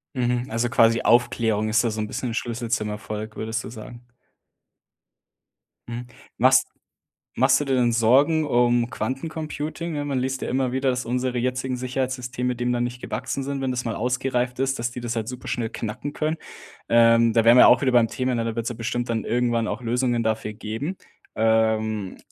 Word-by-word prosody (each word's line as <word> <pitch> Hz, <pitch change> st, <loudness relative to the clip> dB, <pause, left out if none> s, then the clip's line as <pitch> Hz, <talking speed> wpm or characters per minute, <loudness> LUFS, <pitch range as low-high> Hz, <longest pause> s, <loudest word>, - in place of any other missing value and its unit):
Mhm, 125 Hz, 0 st, 0 dB
also 115 Hz, +2 st, 0 dB
quasi 115 Hz, -2 st, +4 dB
Aufklärung 115 Hz, -3 st, +2 dB
ist 110 Hz, +2 st, +3 dB
da -, -, +2 dB
so 110 Hz, 0 st, -3 dB
'n 105 Hz, -, -2 dB
bisschen 120 Hz, 0 st, -4 dB
Schlüssel 120 Hz, 0 st, -3 dB
zum 105 Hz, -2 st, 0 dB
Erfolg, 105 Hz, +1 st, -6 dB
würdest 110 Hz, +1 st, -3 dB
du -, -, -7 dB
sagen? 120 Hz, +1 st, -11 dB, 1.8 s
Mhm. 120 Hz, +1 st, -6 dB, 0.3 s
Machst -, -, +5 dB, 0.7 s
machst 130 Hz, +2 st, +4 dB
du -, -, -2 dB
dir 135 Hz, -1 st, +1 dB
denn 120 Hz, -2 st, +2 dB
Sorgen 140 Hz, +8 st, +4 dB
um 120 Hz, -2 st, +2 dB
Quantencomputing, 155 Hz, +6 st, -4 dB
ne, 145 Hz, -, -2 dB
man 140 Hz, -3 st, -1 dB
liest 130 Hz, +1 st, -2 dB
ja -, -, -3 dB
immer 130 Hz, -1 st, 0 dB
wieder, 130 Hz, 0 st, +1 dB
dass 125 Hz, 0 st, -1 dB
unsere 125 Hz, +1 st, -1 dB
jetzigen 125 Hz, +1 st, -1 dB
Sicherheitssysteme 125 Hz, -1 st, -2 dB
dem 120 Hz, +1 st, -1 dB
dann 120 Hz, 0 st, 0 dB
nicht 120 Hz, 0 st, -4 dB
gewachsen 135 Hz, -, -4 dB
sind, 140 Hz, 0 st, -3 dB
wenn 130 Hz, -1 st, -1 dB
das 125 Hz, 0 st, -3 dB
mal 115 Hz, -3 st, -2 dB
ausgereift 125 Hz, +1 st, -1 dB
ist, 135 Hz, 0 st, 0 dB
dass 120 Hz, +1 st, -2 dB
die 125 Hz, -, -6 dB
das 120 Hz, 0 st, -4 dB
halt 115 Hz, 0 st, -3 dB
super 125 Hz, 0 st, -8 dB
schnell 115 Hz, -2 st, -2 dB
knacken 120 Hz, +6 st, -5 dB
können. 155 Hz, +2 st, -1 dB, 0.5 s
Ähm, 115 Hz, 0 st, +5 dB
da 115 Hz, 0 st, +2 dB
wären 120 Hz, +1 st, +8 dB
wir -, -, +8 dB
ja -, -, +9 dB
auch 125 Hz, -, +6 dB
wieder 130 Hz, -2 st, +1 dB
beim 115 Hz, -2 st, +4 dB
Thema, 130 Hz, -1 st, -1 dB
ne, 115 Hz, -, -1 dB
da 115 Hz, 0 st, -3 dB
wird's 115 Hz, -, -2 dB
ja 120 Hz, -, -6 dB
bestimmt 120 Hz, +1 st, -3 dB
dann 115 Hz, -2 st, -1 dB
irgendwann 120 Hz, -1 st, 0 dB
auch 115 Hz, +4 st, -4 dB
Lösungen 120 Hz, 0 st, 0 dB
dafür 110 Hz, -1 st, -1 dB
geben. 115 Hz, -, -5 dB, 0.4 s
Ähm, 110 Hz, -2 st, +1 dB
120 Hz, 195 wpm, -24 LUFS, 115-130 Hz, 1.8 s, ja